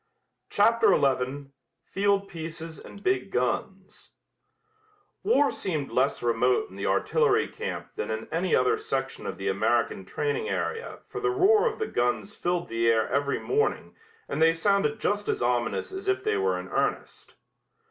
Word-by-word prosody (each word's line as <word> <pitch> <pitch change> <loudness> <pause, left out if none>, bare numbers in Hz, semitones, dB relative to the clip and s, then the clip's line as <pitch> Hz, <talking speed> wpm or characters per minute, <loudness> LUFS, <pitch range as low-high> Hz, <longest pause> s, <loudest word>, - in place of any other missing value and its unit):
CHAPTER 435 -2 +4
XI 135 +1 0 0.4
FIELD 200 0 +1
PIECES 165 -1 -7
AND 200 - -12
BIG 380 - +1
GUNS - - -3 1.1
War 290 - +3
seemed 175 -10 -3
less 130 0 +1
remote 395 - +1
in - - -12
the - - -3
artillery 450 -2 +2
camp 470 +2 -6
than 445 - -4
in - - -3
any - - +1
other 440 -1 +2
section 435 +1 -3
of - - -5
the - - -4
American - - +1
training 445 0 -2
area 460 +1 -3
for 415 - -6
the 410 - +1
roar 420 +5 +4
of 435 - -11
the 440 - -1
guns 125 - -1
filled 175 -2 -1
the 115 0 0
air 110 -1 +2
every 140 0 0
morning 440 +2 -1 0.3
and - - -3
they 165 0 +6
sounded 200 +5 +1
just 205 0 -1
as - - 0
ominous 120 - 0
as 385 +1 -7
if 385 0 +1
they 430 0 +1
were 420 +3 +1
in - - -7
earnest. - - -3
205 Hz, 160 wpm, -27 LUFS, -, 1.1 s, they